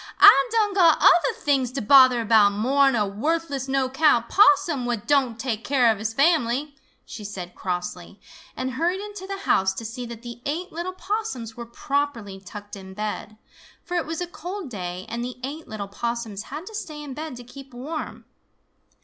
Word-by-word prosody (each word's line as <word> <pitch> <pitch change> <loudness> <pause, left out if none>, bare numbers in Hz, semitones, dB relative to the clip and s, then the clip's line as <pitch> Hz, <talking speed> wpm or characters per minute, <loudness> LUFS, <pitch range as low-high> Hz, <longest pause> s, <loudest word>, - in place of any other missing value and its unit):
Ah - - +9
done 430 -3 +2
got 345 -5 +5
other 445 +7 +5
things 275 - 0
to 275 - -2
bother 255 0 +6
about 210 -2 +5
more'n 270 +5 +3
a 210 -2 +2
worthless, 280 +6 -2
no'count 265 -1 +2
Possum 380 -10 +4
what 235 -4 -2
don' 270 -6 +2
take 230 -2 -3
care 250 -4 +3
of 215 - -3
his 220 +1 -2
fam'ly," 285 0 +1 0.3
she 215 - -9
said 185 -3 -7
crossly, 180 +1 -5 0.4
and 260 0 -2
hurried 340 +8 -1
into 410 -2 -8
the 395 0 -5
house 190 0 +2
to 225 - -6
see 240 +2 -6
that 235 0 -9
the 240 0 -9
eight 350 +6 -3
little 345 +3 -4
Possums 375 - -4
were 235 -1 -8
properly 235 -6 -3
tucked 205 +2 -10
in 190 -1 -11
bed, 215 0 -5 0.5
for 355 - -8
it 345 - -1
was 325 +1 -4
a - - 0
cold 355 -2 -7
day, 180 -3 -5
and 235 +1 -4
the 250 0 -5
eight 295 +5 -6
little 210 -2 -6
Possums 225 0 -4
had 300 +5 -6
to 440 - -10
stay 305 -8 -6
in 280 -2 -7
bed 310 -1 -6
to 245 - -10
keep 270 +2 -13
warm. 285 +6 -6
255 Hz, 185 wpm, -24 LUFS, 220-320 Hz, 0.5 s, Ah